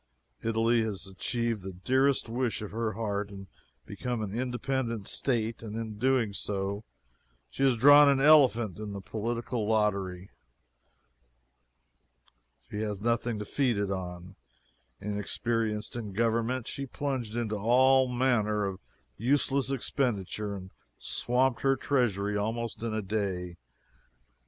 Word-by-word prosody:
Italy 115 +1 +2
has 105 -3 -3
achieved 115 +3 -2
the 95 0 -7
dearest 130 +10 +2
wish 120 -1 -1
of 105 - -6
her 110 0 -2
heart 105 -1 -2
and 100 -1 -9 0.4
become 115 - -3
an 100 -1 -5
independent 125 -3 -2
State 115 -3 -1
and 110 -2 -6
in 115 -1 -4
so 105 - -13
doing 105 -5 0 0.7
she - - -6
has 135 -3 +4
drawn 145 +4 +8
an 140 -1 +3
elephant 130 - +5
in 105 -1 -5
the 100 - -5
political 115 +2 -3
lottery. 100 -4 0 2.4
She 105 - -4
has 105 -2 -2
nothing 115 +1 0
to 105 - -5
feed 125 -4 +1
it 100 -1 -1
on. 90 0 -6 0.6
Inexperienced 105 +2 -2
in 110 -5 -5
government, 115 +3 0
she 140 0 -4
plunged 130 -5 -3
into 115 -3 -1
all 130 +5 +4
manner 120 -5 +1
of 95 -1 -4 0.4
useless 135 +2 +1
expenditure, 105 -6 -1
and 95 -1 -9 0.3
swamped 125 0 +1
her 135 0 +3
treasury 105 -7 0
almost 115 +3 -2
in 115 -1 -2
a 110 -1 -2
day. 95 -4 -2
115 Hz, 130 wpm, -29 LUFS, 105-125 Hz, 2.4 s, drawn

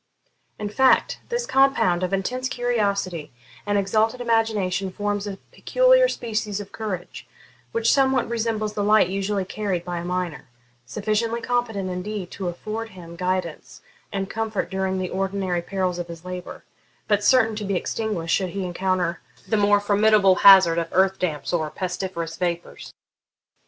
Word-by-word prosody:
In 210 - -4
fact, 260 +5 +3
this 480 0 -1
compound 270 - +3
of 185 0 -1
intense 250 +7 -1
curiosity 200 - -1 0.4
and 205 0 +2
exalted 215 +4 +1
imagination 215 -5 0
forms 205 +1 -2
a 195 -1 -5
peculiar - - +4
species 215 - -3
of 200 -1 -8
courage, 195 -5 -6 0.4
which 230 0 +2
somewhat 265 -2 +2
resembles 225 -2 -2
the 205 - -2
light 210 -3 +4
usually 195 0 -1
carried 190 -3 -3
by 175 -1 -3
a - - -6
miner 180 -3 -3 0.4
sufficiently 215 - -1
competent, 235 -6 -1
indeed, 185 +1 -5
to 190 - -5
afford 215 +6 -5
him 170 -3 -11
guidance 180 -2 -3 0.3
and 195 -1 -2
comfort 220 -1 -3
during 190 0 -1
the 185 -1 -3
ordinary 190 -2 -1
perils 185 -1 -2
of 175 - -4
his 170 0 -10
labour, 180 -1 -7 0.4
but 205 -1 +2
certain 225 -2 +4
to 210 - -4
be 200 -1 -1
extinguished 180 -4 -2
should 190 -2 -1
he 195 +1 -4
encounter 180 -1 -1 0.3
the - - +1
more 205 -1 +4
formidable 205 -1 +4
hazard 190 -4 +7
of 165 - -2
earth 190 +1 +3
damps 160 -2 -2
or 160 -3 0
pestiferous 175 -2 -4
vapours. 175 -1 -4
195 Hz, 150 wpm, -23 LUFS, 180-220 Hz, 0.4 s, hazard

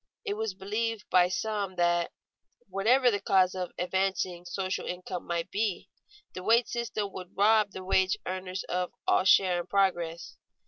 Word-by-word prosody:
It - - -1
was 215 -2 -3
believed 215 +3 -3
by 180 -1 +5
some 200 0 -2
that, 175 -1 +1 0.6
whatever 245 +6 +3
the 205 - -1
causes 185 -1 +3
of 180 - -4
advancing 185 -1 -1
social 185 +2 -3
income 180 0 -5
might 170 -1 -2
be, 205 -3 -2 0.4
the 185 - -6
wage 230 +4 +3
system 220 -4 -3
would 185 0 -9
rob 215 +1 +4
the 190 -1 -8
wage 190 +1 +2
earners 185 0 -4
of 180 0 -3
all - - +3
share 185 -2 +5
in 175 - -5
progress. 175 -4 0
190 Hz, 155 wpm, -29 LUFS, 180-205 Hz, 0.6 s, by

